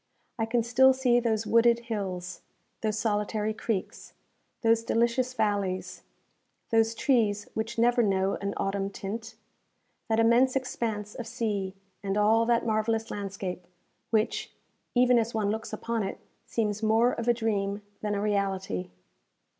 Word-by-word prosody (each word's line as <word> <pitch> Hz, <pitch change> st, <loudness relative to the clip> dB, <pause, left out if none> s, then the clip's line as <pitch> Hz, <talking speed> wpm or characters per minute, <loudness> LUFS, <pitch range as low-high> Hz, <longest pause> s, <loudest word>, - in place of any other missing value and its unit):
I 225 Hz, -, 0 dB
can 235 Hz, 0 st, +1 dB
still 260 Hz, +3 st, +5 dB
see 255 Hz, -2 st, +3 dB
those 225 Hz, -2 st, 0 dB
wooded 235 Hz, +1 st, +4 dB
hills, 190 Hz, -6 st, -4 dB, 0.4 s
those 215 Hz, -1 st, -1 dB
solitary 215 Hz, 0 st, 0 dB
creeks, 215 Hz, -3 st, -4 dB, 0.5 s
those 225 Hz, 0 st, +4 dB
delicious 240 Hz, +3 st, +1 dB
valleys, 195 Hz, -5 st, -1 dB, 0.7 s
those 225 Hz, 0 st, +3 dB
trees 215 Hz, -6 st, +1 dB
which 220 Hz, +2 st, -3 dB
never 240 Hz, +1 st, +4 dB
know 195 Hz, -2 st, +1 dB
an 200 Hz, 0 st, -2 dB
autumn 195 Hz, 0 st, -1 dB
tint, 220 Hz, +3 st, -6 dB, 0.7 s
that 220 Hz, 0 st, +2 dB
immense 240 Hz, +3 st, +4 dB
expanse 225 Hz, -5 st, -2 dB
of 240 Hz, -, -6 dB
sea, 210 Hz, -5 st, -2 dB, 0.3 s
and 195 Hz, 0 st, -2 dB
all 220 Hz, +2 st, +4 dB
that 235 Hz, -1 st, +2 dB
marvellous 225 Hz, 0 st, 0 dB
landscape, 190 Hz, -3 st, -5 dB, 0.4 s
which, 220 Hz, -1 st, 0 dB, 0.4 s
even 245 Hz, 0 st, +5 dB
as 230 Hz, 0 st, -2 dB
one 205 Hz, -2 st, +1 dB
looks 220 Hz, +1 st, -4 dB
upon 230 Hz, -1 st, -2 dB
it, 195 Hz, -, -3 dB, 0.3 s
seems 210 Hz, -2 st, -1 dB
more 225 Hz, +3 st, +4 dB
of 230 Hz, -, -4 dB
a 240 Hz, -, +5 dB
dream 205 Hz, -3 st, -1 dB, 0.2 s
than 210 Hz, -1 st, -1 dB
a 200 Hz, -, -1 dB
reality. 195 Hz, -, -1 dB
220 Hz, 140 wpm, -28 LUFS, 200-235 Hz, 0.7 s, still